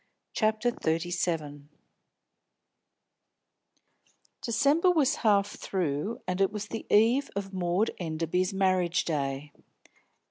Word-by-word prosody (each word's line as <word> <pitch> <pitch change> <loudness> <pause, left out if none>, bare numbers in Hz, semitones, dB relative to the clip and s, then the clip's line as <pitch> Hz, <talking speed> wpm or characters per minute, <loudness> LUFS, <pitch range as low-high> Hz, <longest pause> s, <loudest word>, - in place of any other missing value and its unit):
CHAPTER 220 +2 +1
XXXVII 165 -4 -2
FORBIDDEN 150 -5 -3 2.7
December 285 - +2
was 310 -7 +2
half 205 -2 +3
through, 180 +3 -2
and 185 +1 -1
it 195 - +3
was 210 0 -5
the 225 - -6
eve 235 +7 +4
of 195 -1 -4
Maud 185 +3 0
Enderby's 170 +2 -1
marriage 185 -2 +1
day. 140 -2 -2
185 Hz, 100 wpm, -28 LUFS, 165-220 Hz, 2.7 s, eve